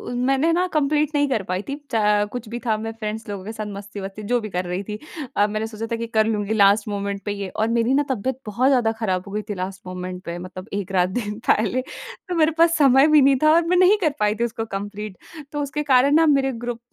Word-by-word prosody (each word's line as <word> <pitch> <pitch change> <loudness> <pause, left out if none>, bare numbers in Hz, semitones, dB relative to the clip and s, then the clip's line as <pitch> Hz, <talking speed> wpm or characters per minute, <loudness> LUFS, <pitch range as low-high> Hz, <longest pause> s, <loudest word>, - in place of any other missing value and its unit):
मैंने 270 +6 +2
न 355 +2 +2
कंप्लीट 300 0 +1
नहीं 290 0 +3
कर 225 -6 0
पाई 185 0 -2
थी। 280 - -2 0.2
चा 210 -2 +3
कुछ 245 -3 -6
भी 240 +2 -4
था 220 -2 +2
मैं 225 +1 -4
फ्रेंड्स 220 +1 -4
लोगों 195 -2 -6
के 220 - -5
साथ 215 -1 -5
मस्ती-वस्ती 200 0 -7
जो 245 - +4
भी 215 - -6
कर 180 -1 -2
रही 180 +2 -3
थी। 210 +1 -6 0.4
अ, 205 - +4
मैंने 215 +1 -3
सोचा 220 0 -6
था - - +1
कि 230 0 -4
कर 220 -1 +2
लूँगी 210 -1 -1
लास्ट 205 0 +4
मोमेंट 200 -1 -3
पे 205 - -1
ये 200 -2 -5
और 220 +4 -1
मेरी 235 +2 +2
न 285 +2 +3
तबियत 260 +1 -2
बहुत 220 +5 +1
ज़्यादा 245 -5 +3
खराब 185 -5 -1
हो - - -8
गई 210 +1 -2
थी - - -1
लास्ट 185 +1 -5
मोमेंट 180 0 -6
पे 170 0 -4
मतलब 185 +2 -8
एक 200 -1 -3
रात 180 -1 +2
दिन 210 0 -3
पहले। 225 +4 +2 0.5
तो 355 - -1
मेरे 320 -1 +3
पास 335 0 +5
समय 275 -1 +6
भी 305 -1 +6
नहीं 275 0 +5
था 310 - +6
और 335 +1 +4
मैं 360 +1 +3
नहीं 370 +3 +6
कर 310 -5 +2
पाई 210 0 +2
थी 230 - -1
उसको 225 -1 -3
कंप्लीट, 205 -1 -6 0.3
तो 295 - -2
उसके 290 +1 -3
कारण 280 +2 +4
न 325 -1 +4
मेरे 270 -1 +2
ग्रुप 240 -1 -3
220 Hz, 255 wpm, -22 LUFS, 200-270 Hz, 0.5 s, समय